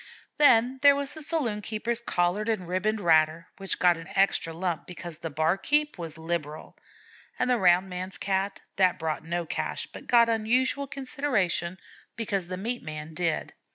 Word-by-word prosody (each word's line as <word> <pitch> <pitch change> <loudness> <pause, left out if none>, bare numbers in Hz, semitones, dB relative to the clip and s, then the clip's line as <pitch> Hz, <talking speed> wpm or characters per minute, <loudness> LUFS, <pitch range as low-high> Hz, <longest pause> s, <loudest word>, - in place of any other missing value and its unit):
Then 255 -2 +5
there 285 -1 +7
was 280 0 -3
the 315 - -6
saloon 285 -9 0
keeper's 230 +2 -3
collared 190 +1 0
and 200 -6 -1
ribboned 200 +5 0
ratter, 160 -2 +3
which 195 -1 -3
got 175 -2 +4
an 165 0 -10
extra 195 -4 +2
lump 170 0 -3
because 175 -2 -8
the 165 - -4
'barkeep' 195 - +1
was 165 -2 -6
liberal; 160 -2 -4 0.6
and 250 - 0
the 250 -2 +2
rounds 180 0 +4
man's 185 +1 -5
Cat, 195 0 -1 0.2
that 185 -2 +3
brought 160 -2 -3
no 170 +1 -2
cash, - - -3
but - - -12
got 235 -1 +6
unusual 245 +5 +1
consideration 250 - -1 0.4
because 200 -5 -2
the 185 0 -5
meat 235 +6 -3
man 155 0 -7
did. 165 -1 -1
190 Hz, 165 wpm, -27 LUFS, 170-235 Hz, 0.6 s, there